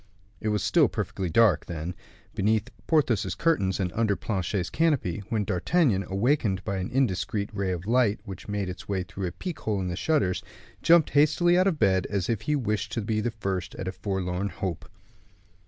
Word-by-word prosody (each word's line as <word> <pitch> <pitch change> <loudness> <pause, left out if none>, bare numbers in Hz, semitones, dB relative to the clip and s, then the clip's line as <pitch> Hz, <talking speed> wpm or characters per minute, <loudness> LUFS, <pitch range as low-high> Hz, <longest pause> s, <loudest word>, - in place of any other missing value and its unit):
It - - -4
was 105 -2 0
still - - +4
perfectly 95 -2 -3
dark, 110 +4 +4
then, 85 +1 -4 0.4
beneath 110 +4 +1 0.2
Porthos's 140 - +2
curtains 100 - +1
and 90 -2 -1
under 110 -3 +1
Planchet's 95 -3 -2
canopy, 145 - +1
when 110 -2 0
D'Artagnan, 100 - +1
awakened 100 -2 +1
by 100 - -1
an 90 0 -3
indiscreet 105 -5 0
ray 100 -2 -1
of 90 0 -4
light 115 -2 +2
which 95 -3 -8
made 105 -2 -2
its 90 +2 -8
way 95 -2 0
through 95 0 -5
a - - -4
peek 175 - -6
hole 105 -2 -1
in 90 -1 -2
the 85 - -3
shutters, 90 - +1 0.4
jumped 170 -2 +5
hastily 155 +4 +4
out 185 +2 +4
of 180 -5 +1
bed, 95 -6 +2
as 100 -3 -1
if 115 -3 0
he 150 +7 0
wished 105 -6 -1
to 115 - -1
be 110 +1 -1
the 120 - 0
first 95 -5 -4
at 95 - -5
a - - -1
forlorn 95 0 -2
hope. 90 -1 -5
100 Hz, 190 wpm, -27 LUFS, 95-120 Hz, 0.4 s, jumped